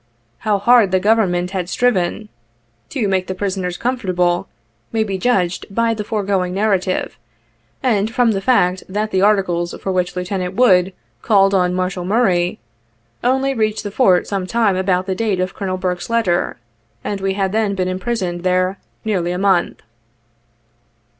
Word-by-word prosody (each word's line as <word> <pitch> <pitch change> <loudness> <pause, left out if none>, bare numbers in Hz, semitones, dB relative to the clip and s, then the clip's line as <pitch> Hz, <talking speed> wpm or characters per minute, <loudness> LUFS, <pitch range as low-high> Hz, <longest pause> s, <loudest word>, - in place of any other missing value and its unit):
" 115 0 -43
How 210 -1 +3
hard 230 0 +5
the 185 0 +2
G 200 - -4
overnment 180 -5 +2
had 185 -2 -3
striven 215 -3 0 0.2
' 115 0 -43
' 115 0 -43
to 225 -6 -1
make 190 -1 0
the 185 - -4
prisoners 185 -2 -3
comfortable 180 -8 0 0.4
may 220 -1 +1
be 195 -3 -3
judged 185 -5 0
by 230 +3 +1
the 215 -1 -4
foregoing 195 -4 -1
narrative, 195 -3 0 0.6
and 220 -5 +1
from 235 0 +2
the 195 -2 -1
fact 190 -5 +2
that 210 +3 -2
the 190 - +1
articles 190 -4 +1
for 190 - -3
which 180 -1 -1
Lieutenant 180 0 -3
Wood 190 -6 +4 0.3
called 195 -2 +3
on 180 -2 +2
Marshal 185 0 -2
Murray, 185 -3 +1 0.7
only 265 +2 +1
reached 215 -3 -1
the 205 - -5
Fort 190 -6 +3
sometime 200 +1 0
about 185 -1 0
the 190 - -1
date 200 -1 -1
of 185 0 -1
Colonel 185 -2 -3
Burke's 180 0 -3
letter, 225 - 0 0.5
and 200 -2 -3
we 195 0 -1
had 195 -1 0
then 210 -2 0
been 185 -1 -1
imprisoned 185 -2 -2
there 185 +1 0 0.3
nearly 180 -5 0
a 180 - -2
month. 190 -2 +1
190 Hz, 165 wpm, -18 LUFS, 180-215 Hz, 0.7 s, hard